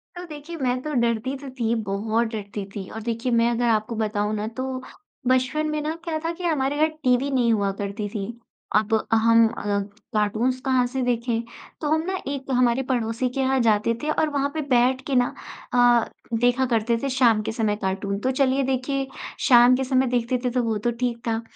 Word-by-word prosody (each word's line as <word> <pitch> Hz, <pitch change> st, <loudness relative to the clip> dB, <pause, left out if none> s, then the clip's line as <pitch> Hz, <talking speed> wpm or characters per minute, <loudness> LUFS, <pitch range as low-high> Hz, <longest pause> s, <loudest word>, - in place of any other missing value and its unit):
तो 355 Hz, +1 st, -7 dB
देखिए 305 Hz, +1 st, -8 dB
मैं 255 Hz, -3 st, 0 dB
तो 305 Hz, +2 st, -4 dB
डरती 235 Hz, +3 st, 0 dB
तो 275 Hz, 0 st, -9 dB
थी 230 Hz, -1 st, +1 dB, 0.2 s
बहुत 220 Hz, +4 st, 0 dB
डरती 205 Hz, -2 st, -5 dB
थी। 195 Hz, -2 st, -6 dB
और 220 Hz, -, -7 dB
देखिए 235 Hz, +2 st, -2 dB
मैं 235 Hz, 0 st, +3 dB
अगर 240 Hz, +1 st, 0 dB
आपको 220 Hz, +1 st, 0 dB
बताऊँ 210 Hz, -1 st, -1 dB
ना 210 Hz, +1 st, -2 dB
तो 260 Hz, +1 st, -2 dB, 0.6 s
बचपन 260 Hz, +5 st, +2 dB
में 305 Hz, 0 st, -1 dB
ना 310 Hz, +2 st, -2 dB
क्या 330 Hz, -2 st, -2 dB
था 330 Hz, -, +1 dB
कि 360 Hz, +2 st, -9 dB
हमारे 290 Hz, -4 st, 0 dB
घर 310 Hz, +1 st, +4 dB, 0.2 s
टीवी 255 Hz, +1 st, +2 dB
नहीं 245 Hz, -3 st, +2 dB
हुआ 200 Hz, -2 st, +1 dB
करती 200 Hz, +1 st, -3 dB
थी। 200 Hz, -2 st, -4 dB, 0.5 s
अब 215 Hz, +1 st, +2 dB, 0.2 s
हम 230 Hz, +1 st, +5 dB
अ, 220 Hz, -, -6 dB, 0.5 s
कार्टून्स 220 Hz, +5 st, +1 dB
कहाँ 260 Hz, -1 st, +2 dB
से 260 Hz, +2 st, -3 dB
देखें? 235 Hz, -1 st, 0 dB, 0.4 s
तो 300 Hz, -, -1 dB
हम 315 Hz, 0 st, +3 dB
ना 380 Hz, 0 st, -1 dB
एक 275 Hz, -1 st, -4 dB
हमारे 250 Hz, 0 st, +3 dB
पड़ोसी 245 Hz, -1 st, -1 dB
के 250 Hz, -, -5 dB
यहाँ 265 Hz, 0 st, +2 dB
जाते 220 Hz, 0 st, +3 dB
थे 305 Hz, -, -1 dB
और 310 Hz, -, +1 dB
वहाँ 280 Hz, -1 st, 0 dB
पे 315 Hz, -, -2 dB
बैठ 255 Hz, -2 st, +2 dB
के 275 Hz, -, 0 dB
ना 245 Hz, -1 st, +2 dB, 0.4 s
अ, 245 Hz, -1 st, +4 dB, 0.3 s
देखा 245 Hz, +2 st, +3 dB
करते 230 Hz, -1 st, +1 dB
थे 275 Hz, -, 0 dB
शाम 245 Hz, -5 st, +3 dB
के 215 Hz, -, -3 dB
समय 220 Hz, -2 st, 0 dB
कार्टून। 195 Hz, +1 st, -2 dB
तो 255 Hz, +5 st, 0 dB
चलिए 265 Hz, 0 st, +2 dB
देखिए 265 Hz, +1 st, -1 dB, 0.4 s
शाम 245 Hz, -1 st, +7 dB
के 265 Hz, -, -1 dB
समय 260 Hz, 0 st, +2 dB
देखते 240 Hz, +2 st, 0 dB
थे -, -, +3 dB
तो 250 Hz, 0 st, +1 dB
वो 225 Hz, -2 st, 0 dB
तो 240 Hz, +3 st, 0 dB
ठीक 245 Hz, -2 st, 0 dB
था। 225 Hz, 0 st, 0 dB
245 Hz, 210 wpm, -24 LUFS, 225-265 Hz, 0.6 s, शाम